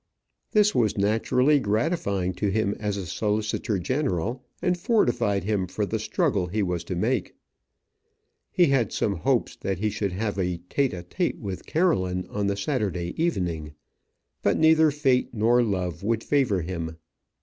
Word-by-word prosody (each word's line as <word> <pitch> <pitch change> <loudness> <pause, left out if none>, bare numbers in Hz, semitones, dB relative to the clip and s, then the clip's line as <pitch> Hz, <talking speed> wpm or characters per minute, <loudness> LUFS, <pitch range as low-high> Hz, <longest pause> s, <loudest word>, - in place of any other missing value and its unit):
This 210 -1 +4
was 110 -4 +1
naturally 125 +8 +3
gratifying 100 - 0
to 100 +3 -1
him 100 0 +1
as 105 -2 -2
a 95 - -4
solicitor 105 +3 -1
general, 125 - -1 0.2
and 180 0 +1
fortified 120 - +1
him 100 -2 0
for 105 +4 -2
the 110 +2 -2
struggle 100 -3 0
he 105 +4 -1
was 90 -2 -2
to 90 - -3
make. 110 +4 -1 1.1
He 180 - +4
had 135 - +2
some 100 -3 0
hope 80 - +1
that 95 -1 -2
he 105 +3 0
should 100 -3 -2
have 100 +1 -2
a 90 -2 0
tête 140 -2 +1
à 90 -1 -6
tête 175 - -2
with 95 -5 -6
Caroline 95 - +1
on 100 -1 -1
the 100 0 -1
Saturday 100 - -2
evening. 85 - -2 0.7
But - - +2
neither 160 0 +5
fate 135 -5 +1
nor 115 +3 +4
love 90 -7 -2
would 115 +2 0
favour 125 -10 +2
him. 80 -2 -5
105 Hz, 160 wpm, -25 LUFS, 95-130 Hz, 1.1 s, neither